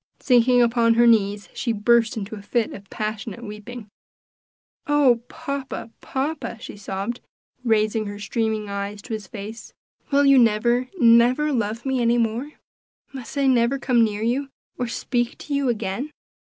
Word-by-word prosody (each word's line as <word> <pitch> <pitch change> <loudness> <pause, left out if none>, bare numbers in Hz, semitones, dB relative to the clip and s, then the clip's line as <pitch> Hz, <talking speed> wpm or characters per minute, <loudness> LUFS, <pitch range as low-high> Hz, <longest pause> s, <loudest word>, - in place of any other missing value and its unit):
Sinking 245 -1 +4
upon 230 -1 +3
her 240 +1 +5
knees 205 -3 +3
she 245 - -2
burst 230 +1 +2
into 210 0 -5
a 205 - -9
fit 225 +2 -1
of 200 -1 -11
passionate 215 +1 -5
weeping. 210 +1 -8 1.0
"Oh! 280 -5 +4
papa, 275 -4 -6
papa!" 280 -2 -3
she - - -9
sobbed, 200 +3 -5 0.4
raising 215 -2 +1
her 205 0 -6
streaming 220 0 -2
eyes 200 +1 -5
to 235 - -6
his 215 -3 -5
face, 220 +3 -9 0.4
"will 285 0 +3
you 275 -1 +7
never, 240 +2 +2
never 245 +5 +5
love 230 0 -2
me 265 -2 0
any 235 0 +3
more? 235 +6 -1 0.6
must 265 +1 -8
I 280 - +2
never 255 0 +3
come 245 -3 +3
near 210 -1 -1
you, 265 +4 0 0.3
or 250 - -2
speak 240 0 -2
to 295 - -6
you 280 -2 +1
again?" 225 +4 -2
235 Hz, 155 wpm, -23 LUFS, 215-255 Hz, 1.0 s, you